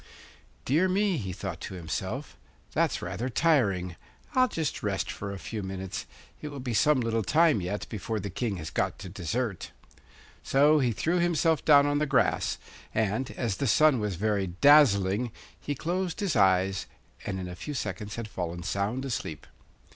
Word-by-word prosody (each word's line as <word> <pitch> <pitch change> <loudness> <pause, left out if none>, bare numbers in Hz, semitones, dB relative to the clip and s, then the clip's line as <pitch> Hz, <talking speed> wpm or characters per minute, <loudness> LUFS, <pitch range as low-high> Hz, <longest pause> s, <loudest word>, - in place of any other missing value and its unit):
'Dear 165 +8 +3
me,' 195 -1 +2
he 100 -8 -4
thought 90 - -6
to - - -6
himself, 95 - -4 0.4
'that's - - +1
rather 125 +3 -3
tiring! 105 - +2 0.4
I'll 255 -2 +4
just 160 - -3
rest 95 -4 -1
for 100 0 -6
a 100 - -5
few 110 +2 -5
minutes; 95 -1 -5 0.3
it - - -5
will 145 -2 -7
be 125 -2 -3
some 150 +4 +4
little 115 -1 0
time 155 - +3
yet 95 +3 -3
before 110 0 -3
the 100 0 -5
King 105 0 -2
has 80 -2 -6
got - - -1
to 95 - -8
dessert.' 100 +3 -3 0.7
So 150 +3 +4
he 125 -4 +2
threw 170 +10 0
himself 165 -3 +2
down 145 -2 +6
on 145 0 +1
the 150 - 0
grass, 135 -1 +1 0.4
and, 110 +4 0
as 115 -6 -1
the 140 - -1
sun 150 +2 +5
was 105 -3 -2
very 100 +1 0
dazzling, 105 - +4 0.3
he 145 - -3
closed 175 - -2
his 200 -7 0
eyes, 95 -2 +3 0.4
and 95 - -2
in 90 - -5
a 90 - -6
few 150 +9 -6
seconds 105 -2 -4
had 115 -2 -5
fallen 90 -3 -5
sound 100 +9 -2
asleep. 95 - -4
110 Hz, 175 wpm, -28 LUFS, 95-145 Hz, 0.7 s, down